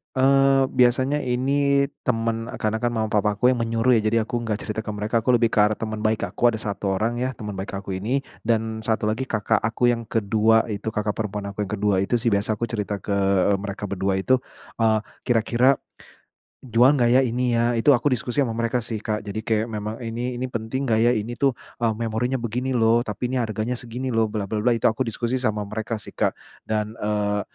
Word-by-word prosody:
Eee, 135 +1 +4
biasanya 130 +3 +3
ini 140 +2 +1 0.2
temen 115 -1 0
e - - -6
karena 110 0 0
kan 120 - 0
mama-papaku 105 +1 +1
yang 125 - 0
menyuruh 115 +1 +2
ya, 110 - -4
jadi 115 - +2
aku 120 +2 -3
enggak 110 -2 -2
cerita 105 0 -4
ke - - -3
mereka. 105 +3 0
Aku 125 +3 +1
lebih 115 -1 +3
ke - - +1
arah 105 +1 +5
teman 110 -1 -4
baik 110 0 +1
aku, 120 -1 +2
ada 110 - -5
1 100 -1 -2
orang 115 +4 -1
ya, 130 +1 -1
teman 105 -1 -6
baik 95 +1 -5
aku 100 0 -6
ini. 125 +8 -1 0.2
Dan 110 -1 0
1 110 -1 0
lagi 125 +4 -2
kakak 110 -1 +1
aku 115 +3 +1
yang 115 -1 -3
ke-2 110 +1 +3
itu, 105 +2 -5
kakak 105 0 0
perempuan 105 -2 -3
aku 105 +1 -3
yang - - -8
ke-2 105 -1 +1
itu 100 +5 0
sih, 120 - +2
biasa 100 +2 +1
aku 110 - -6
cerita 105 -2 -2
ke, 105 - -5 0.4
eee, 100 - +2
mereka 100 +1 -6
berdua 95 0 0
itu. 125 +7 +2 0.4
Eee, 110 -1 +3 0.3
"Kira-kira, 120 +3 +3 0.9
jual 125 +3 +4
nggak 120 -4 +3
ya, 130 +2 +5
ini 120 0 0
ya?" 120 +1 +2
itu 115 +5 +2
aku 130 -2 +4
diskusi 125 +1 -3
sama 115 - -3
mereka 115 +1 -1
sih, 110 -3 -4
Kak. 105 -1 -3
Jadi 105 +1 -4
kayak 110 -1 0
memang, 110 -1 -5
"Ini 120 +1 -4
ini 130 - -2
penting 125 +2 -3
gak 110 -2 +2
ya? 120 - +5
Ini 120 0 -1
tuh, 135 -3 +2 0.2
eee, 115 -2 +2
memorinya 115 +3 -1
begini 120 +3 -3
loh. 115 +1 +4
Tapi 120 +3 -4
ini 125 - +1
harganya 110 +1 -2
segini 125 +1 -4
loh, 110 -1 +2
bla 105 -2 -3
bla 105 +1 -2
bla," 120 +1 +2
itu - - -4
aku 110 +2 +2
diskusi 120 +1 -1
sama 105 -4 -1
mereka 110 +2 -4
sih, 105 - -11
Kak. - - 0 0.2
Dan, 110 0 -2
eee, 105 -1 0
115 Hz, 220 wpm, -23 LUFS, 105-125 Hz, 0.9 s, arah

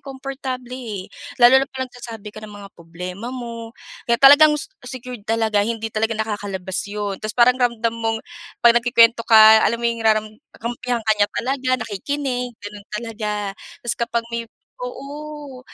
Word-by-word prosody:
komportable, 265 -2 -6
eh. 225 -7 -6 0.3
Lalo 250 +2 +7
na 270 - -2
kapag 260 -1 -6
nagsasabi 225 -4 -9
ka 215 - -10
ng 215 - -9
mga 200 -1 -10
problema 180 +6 -8
mo. 235 -2 -7 0.3
Kaya 235 - +4
talagang 295 +3 +7
se 285 - -6 0.2
secured 250 -3 -8
talaga, 220 -2 +2
hindi 225 +1 -2
talaga 225 +1 0
nakakalabas 200 -4 -3
yun. 205 -1 -4
Tapos 215 0 -5
parang 250 +1 +5
ramdam 235 -2 +1
mong 225 -1 -1 0.5
'pag 235 - +9
nagkukuwento 235 -1 +4
ka, 220 -1 +9
alam 235 - +2
mo 235 - -7
yung 235 -1 0
raram 215 -1 +3 0.3
kampihan 240 0 -3
ka 220 - +4
niya 205 - +4
talaga, 260 +1 -2 0.2
nakikinig, 250 +2 -3
ganun 205 -1 -10
talaga. 210 -3 -4 0.3
Tas 240 - 0
kapag 235 0 -2
may 230 -1 -4 0.3
oo, 295 - -8
230 Hz, 160 wpm, -21 LUFS, 215-255 Hz, 0.5 s, pag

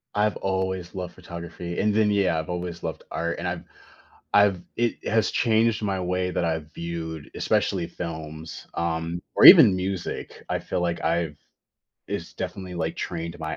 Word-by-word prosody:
I've 105 0 +2
always 95 -2 -2
loved 90 -2 -5
photography, 85 0 -7
and 105 0 +2
then, 105 -1 +3
yeah, 95 -5 +2
I've 80 - -5
always 90 -1 -4
loved 80 - -4
art, 85 +1 -2
and - - -3
I've - - -3 0.7
I've 100 -3 +5
it 120 -1 -1
has 110 0 +2
changed 115 -1 +2
my 100 -2 -1
way 90 0 -1
that 85 - 0
I've 80 -2 -2
viewed, 80 -2 -5
especially 90 -4 +1
films, 80 -1 -7
um, 85 +1 -2
or - - +6
even 95 - +11
music. 95 -1 -4
I - - 0
feel 90 - -3
like 85 -1 -1
I've 80 -3 0 0.7
it's - - -5
definitely, 95 -2 -5
like, 80 -1 -2
trained 85 -1 -4
my 80 -2 -3
85 Hz, 165 wpm, -25 LUFS, 85-95 Hz, 0.7 s, even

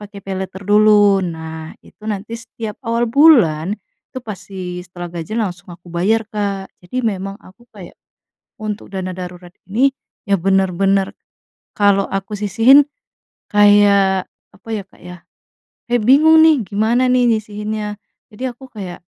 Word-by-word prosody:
pake 205 - -15
paylater 190 0 -5
dulu, 205 -1 +5
nah 160 -2 -6
itu - - -21
nanti 210 +1 -4
setiap 225 -2 -8
awal 235 -1 0
bulan, 225 - +4 0.3
itu - - -19
pasti 185 -4 -7
setelah 175 -1 -9
gajian 215 +7 -2
langsung 180 -2 -7
aku 175 0 -13
bayar 215 +6 +1
Kak, 200 -2 -3
jadi 180 +8 -9
memang 195 -2 -2
aku 230 +3 -20
kayak, 185 -4 -11 0.7
untuk 215 -1 -5
dana 190 -1 -4
darurat 180 -1 -9 0.2
ini 255 +7 +3 0.3
ya 200 - 0
bener-bener, 195 0 +1 0.6
kalau 200 -1 +3
aku 195 +2 -4
sisihin, 240 +7 +5 0.7
kayak 200 -2 +4 0.3
apa - - -20
ya 215 -2 -2
Kak - - -23
ya, 180 0 -9 0.8
ya 245 - +4
bingung 310 +7 +6
nih 300 -7 +3
gimana 225 +6 +1
nih 250 -1 +3
nyisihinnya, 210 0 -5 0.3
jadi 245 +3 -5
aku 265 - -13
kayak 185 -4 -7
205 Hz, 140 wpm, -18 LUFS, 185-220 Hz, 0.8 s, bingung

